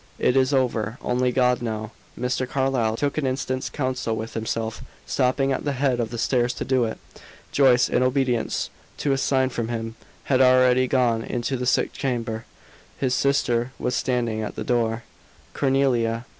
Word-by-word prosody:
"It 125 - +2
is 130 0 +3
over. 120 -4 0
Only 125 0 +1
God 125 -1 +2
now." 110 -2 -4 0.3
Mr. 125 0 -1
Carlyle 130 -5 0
took 145 +3 -1
an 140 - -1
instant's 130 0 -2
counsel 130 -5 -2
with 110 +1 -5
himself, 110 0 -3 0.2
stopping 135 +1 +1
at 130 - -1
the 145 - -1
head 130 -2 +1
of 115 -2 -1
the 120 - -6
stairs 120 +1 +1
to - - -4
do 130 -2 +2
it. 110 - -4 0.5
Joyce, 130 -3 +5
in - - +1
obedience 130 -2 0 0.3
to 145 - 0
a 135 - +2
sign 130 -1 +2
from 120 -3 -3
him, 115 -1 -4 0.3
had 130 -1 +2
already 130 0 +5
gone 120 -3 +2
into 120 +3 -2
the 125 0 -2
sick - - +2
chamber: 115 -4 -3 0.5
his 130 -2 0
sister 125 -3 +1
was 125 - -2
standing 120 -3 0
at 105 - -5
the - - -4
door. 115 -1 0 0.5
"Cornelia." 125 -4 +1
125 Hz, 170 wpm, -24 LUFS, 115-130 Hz, 0.5 s, Joyce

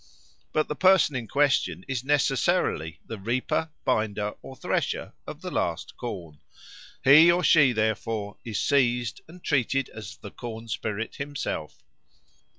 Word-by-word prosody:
But 155 - +1
the - - -2
person 185 -4 +4
in 120 -3 -3
question 135 - +1
is 130 -2 -2
necessarily 135 - +1
the 115 - -7
reaper, 125 +9 -1 0.2
binder, 105 -1 0
or 135 - -10
thresher - - -2
of - - -8
the - - -5
last - - -2
corn. 85 -11 -7 0.6
He 155 +6 +8
or 180 +1 +1
she, 145 -3 +6
therefore, 110 -1 -1
is 110 -3 -3
seized 125 -5 +1
and 175 +2 -14
treated 135 -1 +1
as 105 -3 -9
the 100 - -10
corn 115 -1 -8
spirit 110 0 -3
himself. 140 - -5
120 Hz, 140 wpm, -26 LUFS, 110-145 Hz, 0.6 s, He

